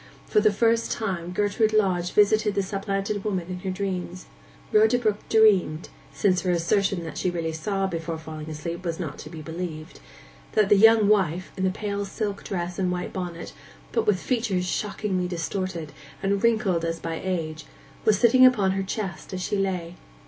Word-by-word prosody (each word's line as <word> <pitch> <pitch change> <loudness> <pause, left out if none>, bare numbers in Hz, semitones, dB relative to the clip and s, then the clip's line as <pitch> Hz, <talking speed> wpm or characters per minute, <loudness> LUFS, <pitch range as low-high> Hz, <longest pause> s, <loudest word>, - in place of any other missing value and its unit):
For - - +3
the 215 0 +4
first 230 +2 +2
time 185 -6 -2
Gertrude 210 +3 +1
Lodge 185 -4 +2
visited 210 0 +3
the 200 - +1
supplanted 195 +1 -2
woman 185 -5 -2
in 180 0 -4
her 190 - -4
dreams. 185 -2 -4 0.5
Rhoda 430 - +5
Brook 215 -4 0
dreamed—since 190 -2 +2
her 185 - -2
assertion 180 +2 +1
that 160 -2 -6
she 185 - +1
really 165 -2 -2
saw, 195 +5 -1
before 165 -3 -3
falling 155 -1 -8
asleep, 170 +3 -5
was 170 -1 -3
not 155 -5 -5
to 150 - -8
be 160 -1 -8
believed—that 155 - -4
the - - +7
young 220 +1 +6
wife, 185 -4 +1
in 190 - -1
the - - +3
pale 200 +1 -3
silk 200 0 -4
dress 175 -1 -4
and 185 -1 +1
white 180 0 -4
bonnet, 175 -3 -5 0.4
but - - 0
with 200 -3 +3
features 220 -8 -1
shockingly 190 -1 -2
distorted, 175 -1 -3 0.3
and 195 0 +1
wrinkled 215 -7 +2
as 165 0 -1
by 165 0 -4
age, 160 -4 -3 0.4
was 215 -2 +4
sitting 240 +4 +5
upon 220 -7 +5
her 195 +1 -1
chest 190 -2 -5
as 185 - -4
she 205 - -1
lay. 185 -4 -1
185 Hz, 175 wpm, -25 LUFS, 170-205 Hz, 0.5 s, the